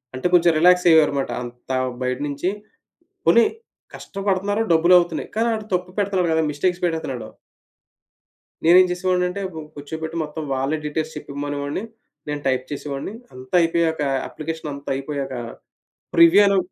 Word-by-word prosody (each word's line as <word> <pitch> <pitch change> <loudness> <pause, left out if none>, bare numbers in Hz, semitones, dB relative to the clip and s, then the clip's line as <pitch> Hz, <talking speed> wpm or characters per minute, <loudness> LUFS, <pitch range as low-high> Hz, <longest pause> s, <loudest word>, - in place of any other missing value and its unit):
అంటే, 130 +7 0
కొంచుం 175 -1 +6
రిలాక్సయ్యారుమాట. 160 -5 +4
అంతా 120 +2 -5 0.3
బయటనించి 140 +6 -2 0.8
పోనీ 230 -1 +6 0.5
కష్టపడుతున్నారు 200 +1 -2
డబ్బులవుతున్నాయి, 175 0 +3
కానీ 225 +1 +1
ఆడు 215 -1 -4
తప్పు 180 0 -3
పెడతన్నాడు 190 -4 +1
కదా! 160 0 +2
మిస్టేక్స్ 175 +5 -1
పెట్టేత్తన్నాడు. 160 -7 -2 1.4
నేనేం 180 +3 +7
చేసేవాడినంటే, 180 +1 0
బ్ - - -13 0.2
కూర్చోబెట్టి 160 +3 -6
మొత్తం 155 +1 -6
వాళ్ళే 135 +4 -1
డీటెయిల్స్ 155 +1 -3
చెప్పేమనేవాడిని, 145 +4 -4 0.5
నేను 145 0 -3
టైప్ 130 -1 0
చేసేవాడిని. 145 +5 -5 0.2
అంతా 130 +5 -5
అయిపోయాక, 165 -1 +1 0.3
అప్లికేషనంతా 155 -3 -6
అయిపోయాక, 135 -1 -4 0.8
ప్రివ్యూ 170 +4 +7
అను 195 - +3
160 Hz, 115 wpm, -22 LUFS, 145-180 Hz, 1.4 s, నేనేం